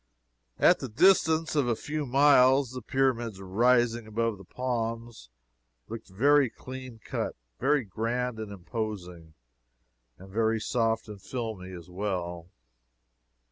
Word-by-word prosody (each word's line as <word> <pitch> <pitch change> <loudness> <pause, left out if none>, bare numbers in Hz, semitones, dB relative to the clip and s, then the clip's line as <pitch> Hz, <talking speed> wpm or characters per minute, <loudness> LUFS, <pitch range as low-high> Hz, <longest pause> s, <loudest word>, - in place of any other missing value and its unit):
At - - +5
the 130 - -5
distance 160 - +3
of 145 -4 +2
a 120 - +2
few 150 +4 -4
miles 135 -1 +5
the 130 0 -6
Pyramids 120 -7 0
rising 120 +4 +2
above 115 -1 -1
the - - -11
palms, 115 - -4 0.6
looked 115 0 -8
very 140 +7 +4
clean 130 0 -9
cut, - - -3 0.2
very 140 +1 +2
grand 115 +3 -2
and 110 -2 -6
imposing, 90 -5 -6 0.8
and 95 +1 -13
very 110 +1 +1
soft 115 0 0
and 105 -2 -9
filmy, 110 -6 -5
as 85 -3 -9
well. 90 -3 -4
115 Hz, 125 wpm, -28 LUFS, 100-130 Hz, 0.8 s, At